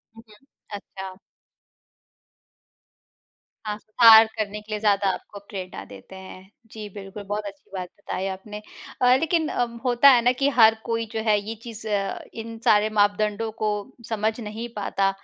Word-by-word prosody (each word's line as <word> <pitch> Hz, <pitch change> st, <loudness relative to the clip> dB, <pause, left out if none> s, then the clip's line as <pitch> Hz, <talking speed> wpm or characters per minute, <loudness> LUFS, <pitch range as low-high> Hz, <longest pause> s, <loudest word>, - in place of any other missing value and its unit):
हुँ, 225 Hz, -, -14 dB, 0.5 s
अच्छा। 190 Hz, -1 st, -9 dB, 2.5 s
हाँ, 210 Hz, -1 st, -3 dB, 0.2 s
हार 225 Hz, -1 st, +10 dB
करने 210 Hz, -1 st, -3 dB
के 215 Hz, +1 st, -15 dB
लिए 210 Hz, -, -2 dB
ज़्यादा 205 Hz, -2 st, +2 dB
आपको 205 Hz, -, -9 dB
प्रेरणा 185 Hz, -, -7 dB
देते 100 Hz, -, -13 dB
हैं। 190 Hz, 0 st, -12 dB, 0.2 s
जी, 215 Hz, -1 st, -7 dB
बिल्कुल 200 Hz, 0 st, -9 dB
बहुत 205 Hz, +1 st, -3 dB
अच्छी 200 Hz, -1 st, -10 dB
बात 185 Hz, -2 st, -5 dB
बताई 190 Hz, -1 st, -4 dB
आपने। 200 Hz, +2 st, -7 dB, 0.4 s
अ, 250 Hz, 0 st, +6 dB
लेकिन 325 Hz, 0 st, +1 dB
अ, -, -, 0 dB, 0.2 s
होता 250 Hz, +2 st, +6 dB
है 250 Hz, -3 st, +6 dB
ना 245 Hz, -, +5 dB
कि 275 Hz, +2 st, +1 dB
हर 225 Hz, -1 st, +7 dB
कोई 230 Hz, -1 st, -1 dB
जो 220 Hz, -, -2 dB
है 215 Hz, -2 st, +3 dB
ये 215 Hz, +3 st, -6 dB
चीज़, 230 Hz, -2 st, -9 dB
इन 220 Hz, +2 st, -4 dB
सारे 215 Hz, -2 st, +4 dB
मापदंडों 210 Hz, +2 st, +1 dB
को 215 Hz, -, +2 dB, 0.4 s
समझ 220 Hz, +1 st, -1 dB
नहीं 220 Hz, +1 st, -6 dB
पाता 195 Hz, -1 st, 0 dB
210 Hz, 155 wpm, -24 LUFS, 200-225 Hz, 2.5 s, हार